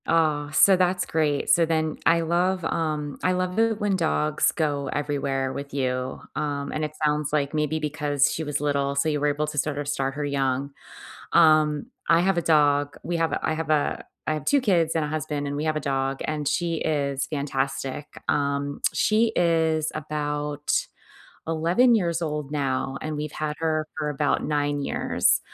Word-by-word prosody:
Aw, 155 -3 +2
so 195 +5 +6
that's 180 0 +1
great. 150 -3 0
So 170 - +5
then, 160 -1 -1
I 165 +1 +5
love, 175 +2 0
um, 150 -3 -2
I 185 - +3
love 185 +2 -1
it 225 -1 +2
when 205 -2 +1
dogs 155 -3 +1
go 145 -4 -1
everywhere 140 -2 -1
with 140 0 -7
you, 130 -1 -2 0.2
um, 140 -1 -2
and 155 - -2
it 155 0 -3
sounds 150 -1 0
like 145 -1 0
maybe 155 0 0
because 145 -2 +1
she 160 - -3
was 150 -1 -2
little, 140 -1 0
so 140 +3 +1
you 150 -1 0
were 150 - +1
able 145 +1 0
to 150 - -6
sorta 145 0 -2
start 135 -1 -2
her 145 0 -2
young. 135 -1 -1 0.6
Um, 155 -3 +4 0.2
I 165 +1 +6
have 185 +1 +2
a - - +2
dog, 145 -3 +2
we 175 - -2
have 165 -1 +1
a - - -1
I - - +1
have 160 -1 -4
a 150 -2 +1 0.2
I 155 - +2
have 155 -2 -5
2 285 - +4
kids 170 -8 +2
and 160 -2 0
a - - -3
husband 150 -1 -3
and 140 - -3
we 145 - -2
have 155 0 0
a - - 0
dog 135 -1 -1
and 150 -1 -2
she 170 +3 0
is 140 -4 -1
fantastic. 135 -1 -3 0.2
Um, 140 0 -1
she 220 +1 +2
is 160 -2 +2
about 150 -1 -3 0.8
11 170 +10 +3
years 170 -6 +1
old 150 -3 -3
now 135 -2 -1
and 155 -1 -4
we've 150 0 -4
had 155 -1 -3
her 155 -1 0
for 155 -1 -2
about 145 0 0
9 145 -1 0
years. - - +1
150 Hz, 190 wpm, -25 LUFS, 145-160 Hz, 0.8 s, so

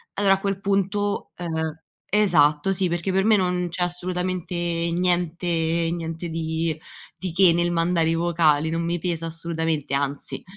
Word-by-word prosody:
allora 195 -1 +4
a 195 - -7
quel 195 -1 -2
punto, 200 +1 -1
ehm 160 -2 -3 0.3
esatto, 175 -4 +3
sì, 185 -1 0
perché 175 +3 -1
per 190 +1 +2
me 220 0 +5
non 180 -1 0
c’è 180 +1 -2
assolutamente 180 0 -2 0.4
niente 175 0 0 0.5
niente 165 0 -4
di 160 0 -2 0.4
di 185 -2 -4
che 185 -2 +6
nel 175 0 +1
mandare 165 -1 +2
i 165 - +1
vocali, 160 -3 +2
non 165 0 -1
mi 170 +1 -1
pesa 165 -1 -2
assolutamente, 160 -3 -2
anzi. 140 0 -2
175 Hz, 155 wpm, -23 LUFS, 160-185 Hz, 0.5 s, che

